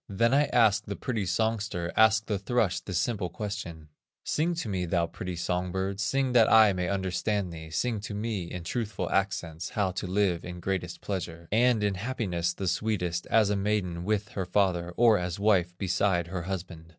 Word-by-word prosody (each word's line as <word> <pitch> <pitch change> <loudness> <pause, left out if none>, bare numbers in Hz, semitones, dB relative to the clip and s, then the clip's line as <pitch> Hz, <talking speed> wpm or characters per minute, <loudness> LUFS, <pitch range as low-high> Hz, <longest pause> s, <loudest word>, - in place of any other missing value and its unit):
"Then 115 +5 +2
I 145 +2 +5
asked 115 -6 +3
the 100 - -3
pretty 110 -5 -2
songster, 105 -5 -1
Asked 110 0 +5
the 105 -4 -1
thrush 100 -3 +1
this 90 0 -4
simple 95 -1 -1
question: 85 -5 -6 0.3
'Sing 170 +3 0
to 165 - -4
me, 95 -3 -1
thou 85 0 +1
pretty 90 +1 -6
song 90 +1 -2
bird, 95 +1 -2
Sing 135 +5 +1
that 120 -3 +5
I 110 -2 +7
may 90 -1 -2
understand 95 0 -1
thee, 80 -1 -9
Sing 110 +7 -1
to 105 0 -6
me 105 -3 -2
in 90 -1 -6
truthful 100 -2 -3
accents, 90 -4 -1
How 100 -3 0
to 95 +1 -4
live 95 -2 +1
in 90 0 -7
greatest 90 -1 -3
pleasure, 85 -4 -5
And 115 0 +3
in 100 -1 +2
happiness 95 -5 -2
the 95 +2 -4
sweetest, 90 -3 -1
As 110 -3 +3
a - - +2
maiden 95 -4 -1
with 105 +1 -1
her 95 -3 -4
father, 90 -3 +1
Or 115 -3 +5
as 90 +1 -3
wife 90 -4 +2
beside 90 -2 +1
her 90 0 -3
husband. 85 -2 -6
95 Hz, 190 wpm, -28 LUFS, 90-110 Hz, 0.3 s, I